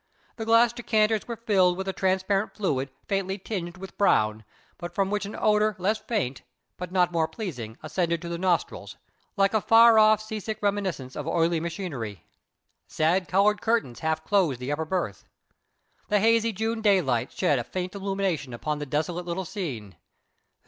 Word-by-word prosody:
The 225 Hz, -, -4 dB
glass 230 Hz, +1 st, +5 dB
decanters 220 Hz, -3 st, +1 dB
were 235 Hz, -, -4 dB
filled 190 Hz, -6 st, +2 dB
with 190 Hz, 0 st, -4 dB
a 190 Hz, -, -1 dB
transparent 190 Hz, +3 st, 0 dB
liquid 140 Hz, -9 st, 0 dB, 0.2 s
faintly 195 Hz, -1 st, -1 dB
tinged 185 Hz, -3 st, -5 dB
with 190 Hz, 0 st, -11 dB
brown, 110 Hz, -, +2 dB, 0.4 s
but 175 Hz, 0 st, -7 dB
from 195 Hz, 0 st, 0 dB
which 210 Hz, -1 st, -1 dB
an 205 Hz, -, -7 dB
odour 215 Hz, 0 st, +2 dB
less 205 Hz, +4 st, 0 dB
faint, 185 Hz, -, -2 dB, 0.3 s
but 180 Hz, -1 st, -7 dB
not 180 Hz, -1 st, +2 dB
more 165 Hz, -2 st, +1 dB
pleasing, 140 Hz, -, -6 dB
ascended 170 Hz, +2 st, -1 dB
to -, -, -5 dB
the 170 Hz, 0 st, -4 dB
nostrils, 180 Hz, -2 st, -1 dB, 0.4 s
like 195 Hz, +1 st, +3 dB
a 220 Hz, -, +2 dB
far 225 Hz, +1 st, +7 dB
off 215 Hz, 0 st, +6 dB
sea 215 Hz, 0 st, -5 dB
sick 215 Hz, +1 st, -4 dB
reminiscence 195 Hz, -11 st, -2 dB
of 150 Hz, -, -5 dB
oily 165 Hz, 0 st, +1 dB
machinery. 150 Hz, -, -5 dB, 0.6 s
Sad 170 Hz, +3 st, +1 dB
coloured 205 Hz, +3 st, +3 dB
curtains 225 Hz, -, 0 dB
half 160 Hz, 0 st, -1 dB
closed 180 Hz, -11 st, +2 dB
the 125 Hz, +3 st, -4 dB
upper 160 Hz, +2 st, -1 dB
berth. 155 Hz, -, -3 dB, 0.8 s
The 210 Hz, -, +2 dB
hazy 230 Hz, +2 st, +3 dB
June 225 Hz, +2 st, -2 dB
daylight 180 Hz, -, +2 dB
shed 140 Hz, -, +1 dB
a -, -, -2 dB
faint 180 Hz, +6 st, -5 dB
illumination 195 Hz, -9 st, -2 dB
upon 150 Hz, +5 st, -3 dB
the 145 Hz, -, -5 dB
desolate 165 Hz, +5 st, -2 dB
little 175 Hz, +2 st, -3 dB
scene. 125 Hz, -, -6 dB
185 Hz, 170 wpm, -26 LUFS, 160-210 Hz, 0.8 s, far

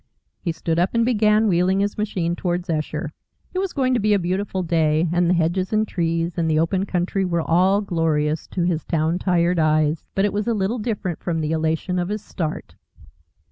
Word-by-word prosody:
He 170 Hz, -, -2 dB
stood 165 Hz, 0 st, -2 dB
up 180 Hz, +6 st, +1 dB
and 230 Hz, 0 st, +3 dB
began 215 Hz, -2 st, +3 dB
wheeling 185 Hz, +1 st, +2 dB
his 205 Hz, 0 st, -1 dB
machine 185 Hz, -5 st, -1 dB
towards 175 Hz, 0 st, -2 dB
Esher. 155 Hz, -1 st, -3 dB, 0.4 s
It 370 Hz, -, -1 dB
was 385 Hz, -1 st, -1 dB
going 260 Hz, -2 st, +1 dB
to 245 Hz, -, +2 dB
be 210 Hz, 0 st, +2 dB
a -, -, +4 dB
beautiful 190 Hz, +1 st, -2 dB
day, 160 Hz, -1 st, +2 dB
and 175 Hz, 0 st, +2 dB
the 180 Hz, -, +3 dB
hedges 175 Hz, +3 st, 0 dB
and 215 Hz, 0 st, +1 dB
trees 165 Hz, -1 st, -1 dB
and 165 Hz, -1 st, +1 dB
the 155 Hz, -, +2 dB
open 185 Hz, +5 st, +1 dB
country 185 Hz, +2 st, -1 dB
were 170 Hz, -3 st, 0 dB
all 185 Hz, +5 st, +3 dB
glorious 160 Hz, -5 st, 0 dB
to 180 Hz, -, -2 dB
his 170 Hz, -3 st, 0 dB
town 165 Hz, +1 st, 0 dB
tired 175 Hz, -2 st, +1 dB
eyes. 155 Hz, 0 st, +2 dB
But 195 Hz, -, +2 dB
it 205 Hz, -, -1 dB
was 210 Hz, +1 st, -2 dB
a 230 Hz, -, +1 dB
little 210 Hz, +4 st, -1 dB
different 205 Hz, -6 st, -3 dB
from 170 Hz, -2 st, -2 dB
the 155 Hz, 0 st, -1 dB
elation 160 Hz, +3 st, 0 dB
of 175 Hz, +1 st, -2 dB
his 210 Hz, 0 st, -3 dB
start. 160 Hz, -7 st, -5 dB
175 Hz, 210 wpm, -22 LUFS, 165-200 Hz, 0.4 s, a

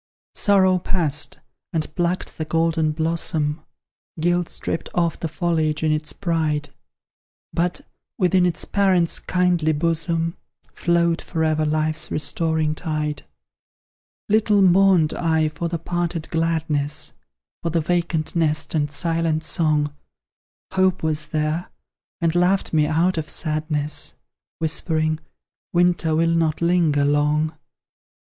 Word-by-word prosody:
Sorrow 190 Hz, -2 st, +3 dB
passed, 155 Hz, -4 st, 0 dB, 0.3 s
and 160 Hz, -2 st, -3 dB
plucked 175 Hz, -1 st, -2 dB
the 155 Hz, -, -1 dB
golden 165 Hz, -1 st, +1 dB
blossom; 160 Hz, -1 st, -1 dB, 0.6 s
Guilt 175 Hz, +1 st, +1 dB
stripped -, -, -4 dB
off 170 Hz, -2 st, +1 dB
the 165 Hz, -, -2 dB
foliage 160 Hz, -1 st, 0 dB
in 155 Hz, -, +2 dB
its 155 Hz, 0 st, -1 dB
pride 155 Hz, -5 st, -1 dB, 0.8 s
But, 175 Hz, +1 st, 0 dB, 0.4 s
within 180 Hz, 0 st, +3 dB
its 175 Hz, -, -1 dB
parent's 185 Hz, -4 st, +2 dB
kindly 180 Hz, -3 st, +1 dB
bosom, 165 Hz, +1 st, 0 dB, 0.4 s
Flowed 170 Hz, -1 st, +1 dB
for 160 Hz, -2 st, -2 dB
ever 155 Hz, -1 st, +1 dB
Life's 155 Hz, 0 st, 0 dB
restoring 155 Hz, +1 st, 0 dB
tide. 155 Hz, -2 st, -3 dB, 1.0 s
Little 210 Hz, -1 st, +3 dB
mourned 185 Hz, -3 st, +5 dB
I 160 Hz, -2 st, +1 dB
for 155 Hz, +3 st, -4 dB
the 170 Hz, 0 st, -2 dB
parted 170 Hz, 0 st, -3 dB
gladness, 160 Hz, -3 st, -1 dB, 0.5 s
For 170 Hz, -, -1 dB
the 165 Hz, +1 st, +1 dB
vacant 170 Hz, -1 st, -1 dB
nest 155 Hz, -2 st, +1 dB
and 150 Hz, -2 st, +1 dB
silent 165 Hz, +1 st, 0 dB
song 155 Hz, -3 st, +1 dB, 0.8 s
Hope 190 Hz, -2 st, +1 dB
was 155 Hz, -1 st, 0 dB
there, 155 Hz, +3 st, -1 dB, 0.5 s
and 165 Hz, -1 st, +1 dB
laughed 180 Hz, +2 st, +2 dB
me 155 Hz, -1 st, +3 dB
out 170 Hz, +2 st, +1 dB
of 155 Hz, -, -5 dB
sadness; 155 Hz, -1 st, -1 dB, 0.4 s
Whispering, 155 Hz, -1 st, 0 dB, 0.5 s
"Winter 175 Hz, -2 st, +2 dB
will 165 Hz, +1 st, +2 dB
not 165 Hz, -2 st, +1 dB
linger 170 Hz, -4 st, +2 dB
long!" 150 Hz, +2 st, +1 dB
165 Hz, 120 wpm, -22 LUFS, 155-175 Hz, 1.0 s, mourned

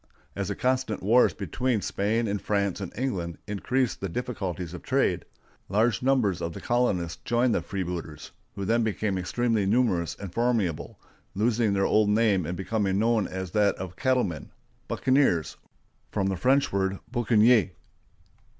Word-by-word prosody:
As 100 Hz, -2 st, -2 dB
the 100 Hz, -, -3 dB
constant 130 Hz, -4 st, -1 dB
wars 115 Hz, +5 st, +5 dB
between 125 Hz, -3 st, -1 dB
Spain 110 Hz, +4 st, 0 dB
and 100 Hz, -1 st, -2 dB
France 100 Hz, -2 st, -1 dB
and 95 Hz, -, -5 dB
England 95 Hz, -10 st, -2 dB
increased 125 Hz, +5 st, -1 dB
the 95 Hz, -, -2 dB
difficulties 95 Hz, -6 st, -4 dB
of 90 Hz, -, -7 dB
trade, -, -, 0 dB, 0.4 s
large 110 Hz, +2 st, +2 dB
numbers 125 Hz, -9 st, +2 dB
of 85 Hz, -1 st, -3 dB
the -, -, -7 dB
colonists 105 Hz, -9 st, 0 dB
joined 120 Hz, 0 st, +2 dB
the -, -, +1 dB
freebooters, 85 Hz, -6 st, -5 dB, 0.2 s
who 100 Hz, -, -4 dB
then 115 Hz, +3 st, +2 dB
became 105 Hz, -2 st, -1 dB
extremely 110 Hz, +3 st, 0 dB
numerous 100 Hz, -7 st, +1 dB
and 95 Hz, -4 st, -8 dB
formidable, 115 Hz, -9 st, -1 dB, 0.4 s
losing 110 Hz, 0 st, +1 dB
their 95 Hz, 0 st, +2 dB
old 105 Hz, -1 st, +3 dB
name 105 Hz, -5 st, +2 dB
and 90 Hz, +1 st, -4 dB
becoming 95 Hz, -1 st, -1 dB
known 115 Hz, 0 st, +2 dB
by 95 Hz, 0 st, -4 dB
that 100 Hz, +3 st, +1 dB
of 95 Hz, -1 st, -6 dB
the -, -, -23 dB
cattlemen—buccaneers, 125 Hz, -, 0 dB, 0.5 s
from 100 Hz, -2 st, -1 dB
the 95 Hz, -, -1 dB
French 135 Hz, +8 st, +2 dB
word 95 Hz, 0 st, 0 dB
boucanier. 115 Hz, -3 st, +4 dB
105 Hz, 150 wpm, -27 LUFS, 95-120 Hz, 0.5 s, wars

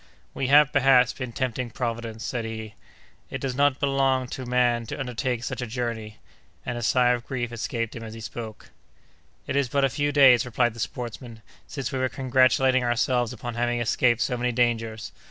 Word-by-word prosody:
"We 135 Hz, -, -2 dB
have, 145 Hz, +1 st, +6 dB
perhaps, 130 Hz, -3 st, +5 dB
been 130 Hz, -3 st, -6 dB
tempting 125 Hz, 0 st, -2 dB
Providence," 115 Hz, -2 st, -4 dB
said 120 Hz, -2 st, -3 dB
he; 110 Hz, -1 st, -6 dB, 0.6 s
"it -, -, -5 dB
does 135 Hz, -2 st, -2 dB
not 140 Hz, +1 st, +2 dB
belong 135 Hz, -2 st, +1 dB
to 130 Hz, -1 st, -6 dB
man 120 Hz, -2 st, +1 dB
to -, -, -6 dB
undertake 125 Hz, -2 st, -2 dB
such 125 Hz, -, -4 dB
a 125 Hz, -, -3 dB
journey!"—and 115 Hz, 0 st, -6 dB
a 120 Hz, -, -4 dB
sigh 125 Hz, +1 st, +3 dB
of 120 Hz, -1 st, -2 dB
grief 120 Hz, -3 st, -3 dB
escaped 115 Hz, -1 st, -3 dB
him 115 Hz, -, -7 dB
as 110 Hz, 0 st, -8 dB
he -, -, -9 dB
spoke. 110 Hz, 0 st, -8 dB, 0.7 s
"It -, -, -3 dB
is 140 Hz, -3 st, +1 dB
but 140 Hz, +2 st, +2 dB
a -, -, +1 dB
few 145 Hz, +2 st, -1 dB
days," 135 Hz, -4 st, +6 dB
replied 120 Hz, -1 st, 0 dB
the 115 Hz, -, -12 dB
sportsman, 115 Hz, 0 st, -6 dB, 0.2 s
"since 135 Hz, -3 st, -4 dB
we 130 Hz, -, -2 dB
were 130 Hz, 0 st, +1 dB
congratulating 130 Hz, 0 st, +3 dB
ourselves 120 Hz, 0 st, +1 dB
upon 120 Hz, -1 st, -6 dB
having 120 Hz, +1 st, 0 dB
escaped 120 Hz, 0 st, +2 dB
so 125 Hz, 0 st, 0 dB
many 125 Hz, +1 st, 0 dB
dangers! 115 Hz, -2 st, -1 dB
125 Hz, 190 wpm, -25 LUFS, 115-130 Hz, 0.7 s, have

